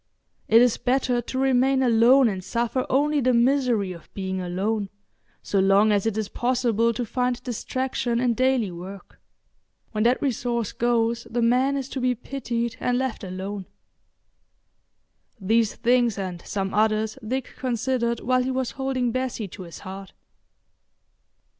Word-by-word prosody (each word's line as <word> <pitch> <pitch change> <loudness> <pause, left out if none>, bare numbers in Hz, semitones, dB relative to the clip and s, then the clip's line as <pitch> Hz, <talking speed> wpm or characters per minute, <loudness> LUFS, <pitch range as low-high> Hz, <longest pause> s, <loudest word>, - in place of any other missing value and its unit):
It 230 +2 +6
is 245 -2 +2
better 250 -1 +1
to 260 - -6
remain 265 0 +3
alone 245 +2 +5
and 190 -4 -3
suffer 235 +5 -1
only 290 +2 +2
the 250 -1 +3
misery 240 -5 +2
of 170 -2 -12
being 190 -1 -3
alone, 195 +3 -2 0.5
so 200 - 0
long 195 +3 +4
as 205 +1 +1
it 220 -1 -1
is 215 -2 -1
possible 235 -1 +1
to 235 +2 -3
find 250 +1 -1
distraction 250 0 -2
in 245 -1 +2
daily 255 -4 +1
work. 185 +3 -10 0.7
When 215 -1 0
that 245 +2 +3
resource 240 -5 -1
goes 235 -1 0
the 240 0 -1
man 255 +4 +2
is 270 -2 -4
to 265 - -4
be 250 0 +1
pitied 235 -1 -4
and 245 -1 0
left 260 -4 -2
alone. 190 +1 -5 1.7
These 220 +2 +1
things 240 -2 +2
and 185 -3 -4
some 195 -1 -2
others 215 +1 +1
Dick 255 +4 -3
considered 240 -1 -1
while 255 +1 +2
he 255 - -1
was 260 -1 -1
holding 265 -3 -1
Bessie 255 -4 -3
to 185 - -10
his 170 -3 -10
heart. 195 0 -9
235 Hz, 150 wpm, -24 LUFS, 210-255 Hz, 1.7 s, It